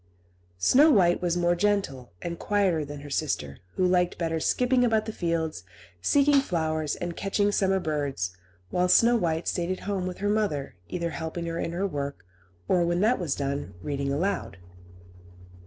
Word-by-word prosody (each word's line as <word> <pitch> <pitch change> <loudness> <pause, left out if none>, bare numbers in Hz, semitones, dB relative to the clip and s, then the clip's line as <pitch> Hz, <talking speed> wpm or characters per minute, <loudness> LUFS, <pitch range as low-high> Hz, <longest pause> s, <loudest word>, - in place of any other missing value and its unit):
Snow 275 - +5
White 180 - +4
was 175 -1 0
more 175 0 +3
gentle, 175 -10 -1
and 170 -1 -4
quieter 195 -6 +1
than 145 0 -8
her 145 - -9
sister, 75 - -2 0.2
who 185 - +2
liked 180 -1 +2
better 165 -1 -1
skipping 250 +8 +2
about 220 -3 +2
the 220 - -4
fields, 165 - -2 0.4
seeking 285 - +4
flowers, 155 - -1
and 175 -1 -5
catching 205 +1 0
summer 190 -1 +2
birds; 145 - -2 0.4
while 180 0 +2
Snow 235 +5 +6
White 165 -6 0
stayed 175 0 -1
at 185 - -3
home 195 -2 -2
with 180 - -5
her 205 - -2
mother, 205 -10 0 0.2
either 170 -1 -2
helping 160 +3 -4
her 165 0 -3
in - - -2
her 180 +4 -1
work, 140 - -4 0.4
or, 180 -2 +3
when 175 +1 +1
that 225 +4 +3
was 165 -6 -1
done, 140 -6 -3
reading 140 -1 -2
aloud. 175 - -2
175 Hz, 170 wpm, -27 LUFS, 150-200 Hz, 0.4 s, Snow